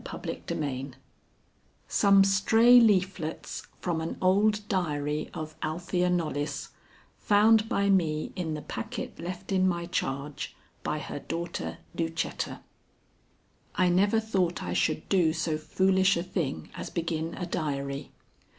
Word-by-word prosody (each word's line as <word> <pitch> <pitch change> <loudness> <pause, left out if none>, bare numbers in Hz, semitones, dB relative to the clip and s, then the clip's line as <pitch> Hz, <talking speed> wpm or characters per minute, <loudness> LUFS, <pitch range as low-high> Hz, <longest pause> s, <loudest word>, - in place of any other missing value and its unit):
EPILOGUE 135 -3 -4 0.9
SOME 200 -1 +5
STRAY 220 +5 +6
LEAFLETS 190 -7 0
FROM 170 -3 -1
AN 160 - -4
OLD 205 +3 +3
DIARY 150 -5 -1
OF 155 -1 -6
ALTHEA 175 +3 0
KNOLLYS, 155 -4 -1 0.5
FOUND 215 +1 +4
BY 200 0 +1
ME 155 -5 +1
IN 165 -4 -2
THE 150 - -6
PACKET - - -6
LEFT 180 +3 -6
IN 185 -1 +3
MY 170 -2 -1
CHARGE 140 -3 -3 0.3
BY 155 - -2
HER 150 -1 -5
DAUGHTER 165 - -4 0.2
LUCETTA. 165 0 -3 1.1
I 185 -2 +3
never 200 +5 +3
thought 190 -6 0
I - - -3
should 155 0 0
do 175 -5 +3
so 160 -1 -1
foolish 190 +3 +3
a 170 - -1
thing 175 -6 -3
as - - -5
begin 165 -1 -2
a 180 - -4
diary. 140 -4 -3
175 Hz, 125 wpm, -28 LUFS, 155-195 Hz, 1.1 s, STRAY